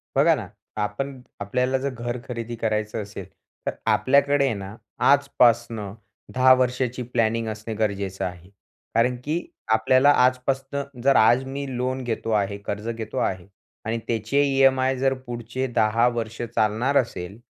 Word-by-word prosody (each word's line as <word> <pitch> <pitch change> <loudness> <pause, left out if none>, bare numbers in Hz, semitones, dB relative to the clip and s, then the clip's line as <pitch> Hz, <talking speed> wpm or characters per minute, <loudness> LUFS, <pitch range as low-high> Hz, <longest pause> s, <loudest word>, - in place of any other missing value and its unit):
बघा 155 +4 +5
ना, 110 -8 -6 0.3
आपण 130 +6 -3 0.2
आपल्याला 125 +6 0
जर 140 +1 -2
घर 120 0 -4
खरेदी 120 -1 -5
करायचं 110 -1 -2
असेल, 100 -2 -8 0.4
तर - - +2 0.2
आपल्याकडे 140 +1 +3
आहे 130 - +1
ना, 100 +1 -7 0.3
आजपासनं 120 -7 +3 0.4
10 130 0 +6
वर्षाची 125 0 0
प्लॅनिंग 115 -1 +1
असणे 110 +1 -5
गरजेचं 100 -3 -2
आहे. 90 0 -7 0.5
कारण 125 +2 +3
की 160 +4 -1 0.3
आपल्याला 130 +5 +5
आजपासनं 135 +2 -1 0.2
जर 135 0 +4
आज 120 +4 +5
मी 140 +1 -4
लोन 130 +1 -2
घेतो 115 -1 -3
आहे, 100 +1 -3
कर्ज 105 +2 -5
घेतो 115 -1 -5
आहे 95 0 -1 0.4
आणि 115 +1 -1
त्याचे 115 +5 +1
ईएमआय 135 -1 +3
जर 135 +1 +2
पुढचे 120 +2 -4
10 115 +3 +3
वर्ष 115 -1 -3
चालणार 120 +4 +1
असेल. 100 -4 -2
120 Hz, 145 wpm, -24 LUFS, 110-130 Hz, 0.5 s, 10